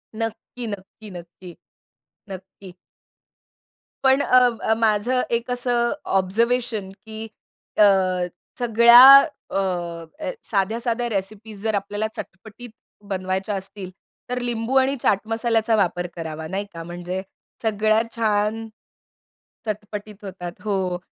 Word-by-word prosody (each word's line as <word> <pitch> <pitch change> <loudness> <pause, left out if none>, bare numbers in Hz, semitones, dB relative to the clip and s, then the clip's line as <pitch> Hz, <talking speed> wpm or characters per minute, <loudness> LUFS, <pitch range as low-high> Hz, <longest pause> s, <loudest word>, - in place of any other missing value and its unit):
नक्की, 225 +1 -5
नक्की, 205 +1 -9
नक्की. 175 0 -11 0.7
नक्की. 190 0 -10 1.3
पण 265 +1 +4
अ, 255 - +5 0.2
अ, 220 - +2
माझं 230 +3 +2 0.2
एक 235 +2 -7
असं 245 -1 0 0.3
ऑब्झर्वेशन, 225 +1 0
की 220 +1 -9 0.5
अ, 210 - +7 0.8
सगळ्या 235 +1 +8 0.5
अ, 175 - -3 0.2
साध्या-साध्या 230 +4 0
रेसिपीज 205 +1 -5
जर 220 -2 0
आपल्याला 205 +2 -2
चटपटीत 220 +5 -9 0.4
बनवायच्या 190 +2 -2
असतील, 190 0 -7 0.4
तर 250 0 -2
लिंबू 240 +1 -2
आणि 265 +1 +3
चाट 200 - +3
मसाल्याचा 225 0 +1
वापर 180 -3 0
करावा. 160 -1 -6
नाही 195 +3 -3
का 165 0 -7
म्हणजे 175 +2 -5 0.4
सगळ्यात 215 +1 +2
छान 220 0 0 1.0
चटपटीत 210 0 -6
होतात. 180 -2 -6
हो, 190 -4 -1
210 Hz, 105 wpm, -23 LUFS, 190-230 Hz, 1.3 s, सगळ्या